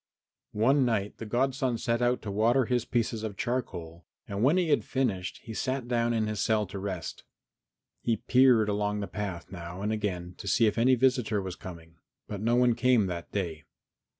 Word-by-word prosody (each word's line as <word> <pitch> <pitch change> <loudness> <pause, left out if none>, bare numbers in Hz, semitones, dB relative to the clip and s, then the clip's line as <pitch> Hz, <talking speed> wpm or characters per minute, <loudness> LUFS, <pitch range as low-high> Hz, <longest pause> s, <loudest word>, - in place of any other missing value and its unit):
XI - - -9
One 135 +6 +4
night 110 -5 -1
the 115 - -6
godson 130 +1 0
set 115 +1 -1
out 120 +1 +1
to 105 - -4
water 115 +5 +3
his 120 0 0
pieces 115 -2 -1
of 110 -3 -5
charcoal 85 - -4 0.2
and 100 0 -3
when 140 +9 +4
he 175 -3 +1
had 145 - +3
finished 110 -9 -1
he 115 - -7
sat 130 +2 -2
down 120 -1 +1
in 110 -2 +1
his 105 -1 -3
cell 105 +2 +2
to 100 +1 -7
rest. 95 -3 -5 0.8
He 115 -2 +1
peered 125 -2 +4
along 105 0 -1
the 100 - -3
path 100 -5 -5
now 90 +1 -7
and 105 - 0
again 90 -5 -3
to - - -7
see 115 +4 +4
if 105 +1 +1
any 130 +3 +5
visitor 125 -4 +2
was 95 -2 -5
coming, 85 -2 -11 0.3
but 100 -2 -5
no 115 +2 +2
one 125 -1 +4
came 120 -2 +3
that 85 -2 -5
day. 80 -7 -3
110 Hz, 200 wpm, -29 LUFS, 100-125 Hz, 0.8 s, any